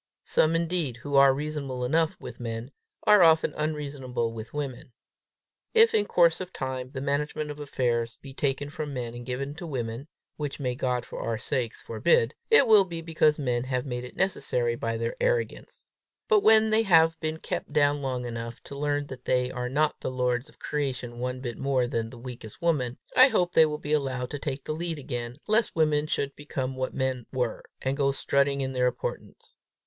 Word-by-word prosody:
Some, 160 +1 +2
indeed, 165 -6 0
who 145 +3 -7
are 140 0 +8
reasonable 140 -3 -3
enough 160 +4 +2
with 120 - -9
men, 115 +2 -5 0.3
are 210 -2 +6
often 160 -2 +5
unreasonable 140 -6 -2
with 110 0 -8
women. 135 -4 -5 0.8
If 455 0 +7
in 205 -1 +2
course 170 0 +4
of 185 0 -6
time 130 -1 -4
the 130 -1 -6
management 150 +2 -1
of 145 - -9
affairs 120 -5 -1
be 135 -1 -11
taken 140 +1 -1
from 150 -2 -5
men 120 -2 -4
and 120 0 -9
given 135 +3 -3
to 175 -1 -6
women 120 -1 -4 0.3
which 145 -1 -4
may 125 -3 -1
God 125 -1 -1
for - - -8
our 115 -1 -2
sakes 120 -1 -3
forbid 480 -1 +2 0.2
it 445 -11 +7
will 215 -4 +7
be 170 -3 -6
because 155 -2 +2
men 125 -3 -1
have 125 0 -1
made 125 -2 -4
it 125 - -9
necessary 125 -11 0
by 115 -1 -2
their 115 0 -2
arrogance. - - -1 0.4
But 435 -2 +5
when 220 - +6
they 220 +1 +5
have 165 -5 +4
been 155 +1 -2
kept - - -4
down 145 -1 +3
long 130 -2 -2
enough 115 0 -5
to 140 - -9
learn 145 0 -1
that 130 -2 -10
they 125 0 +1
are 125 -1 -3
not 150 +3 +1
the - - -2
lords 125 +1 -1
of - - -21
creation 125 -5 -3
one 125 +1 -3
bit 120 -3 -5
more 135 -2 +1
than 115 -2 -2
the 120 - -11
weakest 120 -3 -9
woman, 145 -8 0 0.2
I 255 - +9
hope 180 -9 +1
they 160 - +6
will 150 0 -3
be 150 0 -3
allowed 130 -4 -1
to 145 - -4
take 140 -2 -4
the - - -3
lead 165 0 -3
again, 120 -3 -5
lest 220 +2 +2
women 155 -2 +2
should 140 -2 -2
become 135 -3 -4
what 130 0 -2
men 130 -3 -1
were, 125 -4 -1 0.2
and 130 +1 0
go 140 -1 +2
strutting 140 0 +1
in 135 0 -2
their 125 -1 +2
importance. 125 0 -5
140 Hz, 200 wpm, -27 LUFS, 125-155 Hz, 0.8 s, I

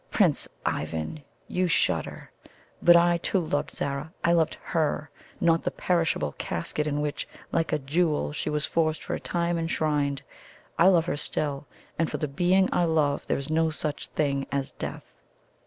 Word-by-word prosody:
Prince - - +2 0.2
Ivan, 80 - -2 0.2
you 185 0 0
shudder; 90 - 0 0.5
but 175 - +8
I 170 0 +5
too 190 - 0
loved 155 -4 -1
Zara 140 +3 -3
I 170 - +4
loved 165 -2 +3
HER, 155 -2 -1 0.3
not 165 -1 +3
the - - +1
perishable 170 - 0
casket 150 - -2
in 150 0 0
which, 150 -1 -2 0.2
like 165 -1 0
a 155 - +2
jewel, 150 +3 0
she 155 - -2
was 150 0 0
for 165 -1 +2 0.2
a - - -2
time 170 -1 -1
enshrined. 150 -4 0 0.6
I 170 - +7
love 175 -4 +5
her 145 - -1
still 145 -1 -2 0.3
and 165 - +2
for - - -3
the 150 - -1
being 180 +6 +3
I 175 - +3
love 155 -3 +1
there - - +1
is 140 +2 -4
no 160 0 +3
such 155 -1 -3
thing 140 -3 -1
as 140 -1 -1
death." - - -7
155 Hz, 170 wpm, -27 LUFS, 145-170 Hz, 0.6 s, but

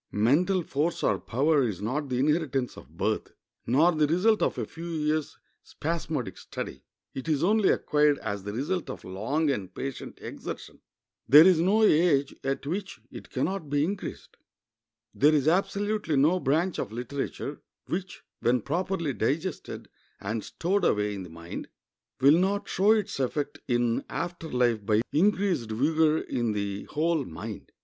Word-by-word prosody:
Mental 165 - +2
force 155 +3 -1
or - - +2
power 145 +5 +2
is 110 -8 -1
not 130 +8 -2
the 125 - -1
inheritance 140 -2 0
of 75 +6 -14
birth, 105 +3 -1 0.3
nor 150 +9 +5
the 155 -3 +2
result 195 +8 +3
of - - +1
a - - -2
few 165 +1 -9
years' 155 -1 -1 0.2
spasmodic 155 - -4
study; - - -7 0.3
it 135 +5 -5
is 150 -1 +1
only 210 +2 +4
acquired 150 -1 +3
as 105 -5 -4
the 100 +2 -5
result 150 - -2
of 130 - -7
long 135 +12 0
and 95 -8 -4
patient 135 -1 -6
exertion. - - -8 0.5
There 150 +6 +10
is 185 -3 +5
no 200 +6 +3
age 150 -7 +3
at 135 +1 -2
which 185 -1 -4
it - - -10
can 130 - -1
not 190 -6 -4
be 145 0 +2
increased. 190 +4 -5 0.8
There 150 +3 +4
is 145 -1 +1
absolutely 200 0 +1
no 155 +7 +4
branch 165 +5 +1
of - - -3
literature 135 +4 -5 0.2
which, 185 +1 -5 0.2
when 120 0 +2
properly 170 - -1
digested 155 +11 -2 0.3
and 105 +2 -3
stowed 195 +4 -1
away 105 0 +2
in 100 - -5
the 90 - -8
mind, 85 +1 -8 0.5
will 145 +5 +6
not 200 +2 0
show 200 +4 +4
its 210 -7 -1
effect 140 +2 -2
in 120 -2 +1
after 175 -2 -4
life 120 -4 +1
by 105 +2 +2
increased 185 - +2
vigor 155 +7 +2
in 120 -7 -1
the 100 -1 -3
whole 160 0 0
mind. 80 -9 -8
150 Hz, 160 wpm, -27 LUFS, 120-175 Hz, 0.8 s, There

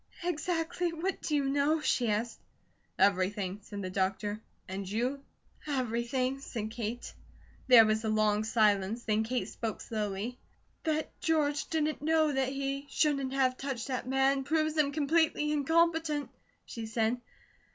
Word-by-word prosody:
"Exactly 345 0 -1
what 340 +4 -3
do 300 - -1
you 285 - +2
know?" 285 +3 +2
she 250 -6 +1
asked. 220 +2 -1 0.6
"Everything," 195 0 +1
said 200 0 -7
the 185 - -3
doctor. 200 +3 -1 0.3
"And 190 0 -5
you?" 250 +7 -1 0.4
"Everything," 255 0 -1
said 220 -5 -5
Kate. 230 +1 -5 0.5
There 240 -3 +9
was 215 +1 +1
a 220 - 0
long 215 -1 +2
silence. 215 0 +2
Then 215 0 +1
Kate 245 +3 -2
spoke 225 -3 -4
slowly: 215 +2 -3 0.5
"That 310 -1 0
George 295 -3 +1
didn't 310 -2 -1
know 315 0 +3
that 265 -2 0
he 275 +1 -3
shouldn't 275 -4 +1
have 260 -2 +2
touched 270 -2 -4
that 255 -1 -3
man, 270 +1 +2
proves 310 +2 +1
him 300 -2 +2
completely 305 0 +2
incompetent," 320 0 +1 0.3
she 225 -2 -6
said. 225 +2 0
260 Hz, 140 wpm, -31 LUFS, 220-300 Hz, 0.6 s, There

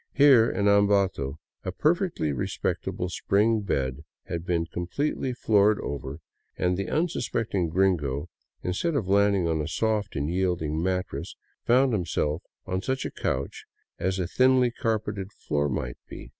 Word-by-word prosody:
Here 135 -5 +6
in 100 +2 0
Ambato 100 -9 +3 0.3
a 95 - -3
perfectly 155 - +1
re 70 - -2
spectable 90 - -2
spring 110 +5 +2
bed 70 -7 -2 0.2
had 85 +1 -5
been 85 -2 +1
completely 130 - -2
floored 105 -3 +3
over, 70 0 -5 0.4
and 90 0 +1
the 100 +1 -3
un 165 +3 +2
suspecting 110 - -1
gringo, 80 -6 +1 0.4
instead 95 - -1
of 110 -9 0
landing 100 -2 +3
on 80 -1 0
a 75 - -3
soft 110 -2 -1
and 70 +1 -1
yielding 85 -3 0
mattress, 90 +1 -2 0.3
found 130 +1 +4
himself 80 -4 -1 0.2
on 95 0 -2
such 130 +5 -2
a - - -3
couch 65 +1 -3 0.3
as 95 +1 0
a 90 - -1
thinly 130 +5 +3
carpeted 110 -5 -2
floor 75 0 -1
might 65 -2 -3
be. - - -9
95 Hz, 150 wpm, -26 LUFS, 85-110 Hz, 0.4 s, Here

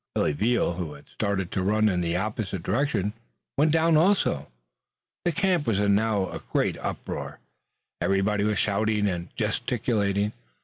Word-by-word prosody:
Billy - - +2
Veal, 110 +2 +1
who 85 -3 -4
had 70 - -15
started 100 -4 -2
to 95 - -1
run 110 +3 +3
in 90 -4 +1
an 85 0 0
opposite 105 -4 -3
direction, 105 -2 0 0.4
went 150 +2 +3
down 165 +1 +4
also. 155 - +3 0.8
The 175 - +3
camp 185 -4 +1
was 105 -4 +2
now 100 -1 +2
in - - -4
a - - -11
great - - +1
uproar. - - -5 0.6
Everybody 100 +1 +2
was 105 -1 +1
shouting 105 +1 +1
and 90 -2 -3
gesticulating. 105 -4 0
105 Hz, 150 wpm, -26 LUFS, 95-115 Hz, 0.8 s, down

